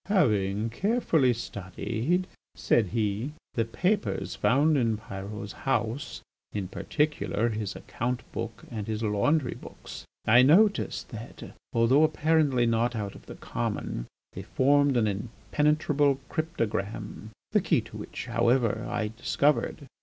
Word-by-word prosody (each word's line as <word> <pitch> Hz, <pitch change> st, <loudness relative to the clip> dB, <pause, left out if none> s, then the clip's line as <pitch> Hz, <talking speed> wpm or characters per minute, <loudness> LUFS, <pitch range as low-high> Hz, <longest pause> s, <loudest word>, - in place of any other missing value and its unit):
"Having 110 Hz, -, +2 dB
carefully 165 Hz, -, +2 dB
studied," 115 Hz, -, -2 dB, 0.3 s
said 110 Hz, -4 st, +2 dB
he, 110 Hz, +6 st, -1 dB, 0.2 s
"the 115 Hz, -, +1 dB
papers 115 Hz, -, -1 dB
found 150 Hz, +5 st, +3 dB
in 115 Hz, -5 st, +2 dB
Pyrot's 100 Hz, -1 st, -7 dB
house, 135 Hz, +1 st, -2 dB, 0.3 s
in 100 Hz, -3 st, -2 dB
particular 145 Hz, -4 st, 0 dB
his 105 Hz, -3 st, -3 dB
account 125 Hz, +2 st, -3 dB
book 115 Hz, -1 st, -5 dB
and 110 Hz, -3 st, -4 dB
his 110 Hz, 0 st, -2 dB
laundry 125 Hz, +7 st, +1 dB
books, -, -, -10 dB, 0.2 s
I 120 Hz, +3 st, +7 dB
noticed 200 Hz, +10 st, +3 dB
that, 115 Hz, +1 st, -9 dB, 0.2 s
though 120 Hz, +6 st, +4 dB
apparently 155 Hz, -5 st, +3 dB
not 115 Hz, +1 st, +1 dB
out 100 Hz, -3 st, -3 dB
of -, -, -15 dB
the -, -, -8 dB
common, -, -, -3 dB, 0.3 s
they -, -, -6 dB
formed 140 Hz, 0 st, +3 dB
an 115 Hz, -, +3 dB
impenetrable 140 Hz, +7 st, +1 dB
cryptogram, 110 Hz, -, -3 dB, 0.2 s
the -, -, +3 dB
key -, -, +2 dB
to -, -, -11 dB
which, -, -, -6 dB
however, 120 Hz, -2 st, +1 dB
I 115 Hz, -3 st, -1 dB
discovered. 140 Hz, +6 st, 0 dB
120 Hz, 125 wpm, -28 LUFS, 110-145 Hz, 0.3 s, I